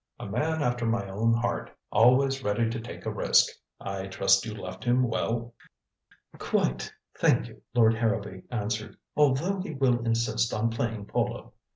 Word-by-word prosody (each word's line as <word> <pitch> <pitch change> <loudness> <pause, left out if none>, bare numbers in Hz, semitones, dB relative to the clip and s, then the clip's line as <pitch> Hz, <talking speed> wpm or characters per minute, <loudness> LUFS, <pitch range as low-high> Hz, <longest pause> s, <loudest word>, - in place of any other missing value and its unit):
A - - -6
man 150 +10 -1
after 120 -2 0
my 115 -3 0
own 105 +4 +1
heart. 115 +1 -1 0.2
Always 135 +4 +4
ready 105 +3 +1
to 115 - -3
take 115 - -9
a - - -1
risk. - - +4 0.3
I 95 -1 -5
trust 95 +1 +3
you 110 - -5
left - - -8
him 125 +1 +3
well?" 115 +1 -2 0.9
"Quite, 60 - 0 0.3
thank - - +3
you," - - -15
Lord 115 -2 +5
Harrowby 105 -4 -1
answered. 110 -2 -3 0.2
"Although 150 +7 +2
he 160 -5 -6
will 130 -3 +2
insist 115 0 0
on 115 +2 0
playing 115 -2 -3
polo. - - -2
115 Hz, 160 wpm, -28 LUFS, 105-125 Hz, 0.9 s, Lord